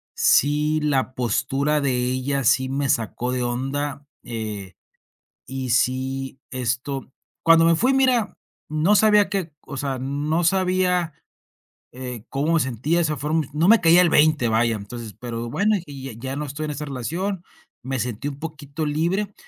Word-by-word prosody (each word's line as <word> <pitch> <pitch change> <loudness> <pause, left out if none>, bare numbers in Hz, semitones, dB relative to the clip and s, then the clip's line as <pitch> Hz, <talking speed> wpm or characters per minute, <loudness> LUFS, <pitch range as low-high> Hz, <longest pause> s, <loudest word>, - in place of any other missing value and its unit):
sí, 150 +2 +3
la 135 -3 0
postura 130 +5 0
de 140 -2 +1
ella, 130 +3 -1
sí 130 +3 +3
me 140 0 -1
sacó 120 +2 -1
de 125 -1 -1
onda, 135 +4 -3 0.2
eh, 105 -5 -6 0.7
y 130 -1 -4
sí, 130 +2 0
esto 130 +2 -3 0.3
Cuando 165 0 +6
me 165 - +5
fui, 255 +10 +2
mira, 255 -5 +2 0.3
no 155 +7 +2
sabía 210 0 +5
que 185 -6 -2
o 140 - -8
sea, 135 -2 -2
no 145 +5 -1
sabía, 180 -2 +1 0.8
eh, 125 -3 -7
cómo 145 +5 0
me - - +4
sentía, 130 +6 0
de - - +2
esa 155 -2 -1
forma 155 +3 0
No 160 +4 +2
me 225 +1 +7
caía 170 +1 +6
el 180 - +4
20, 150 -5 +4
vaya. 115 +1 +2
Entonces 110 +2 -8
Pero 120 -1 -5
bueno, 210 - +2
y 140 -2 -9
ya 135 -3 -6 0.2
ya - - -3
no 150 - -3
estoy 145 +2 -5
en 150 - -3
esa 150 +1 -5
relación. 165 +8 -3 0.4
Me 130 +1 -3
sentí 120 +2 -3
un 140 -1 -9
poquito 155 -1 -5
libre, 175 +7 -1
140 Hz, 165 wpm, -23 LUFS, 130-165 Hz, 0.8 s, me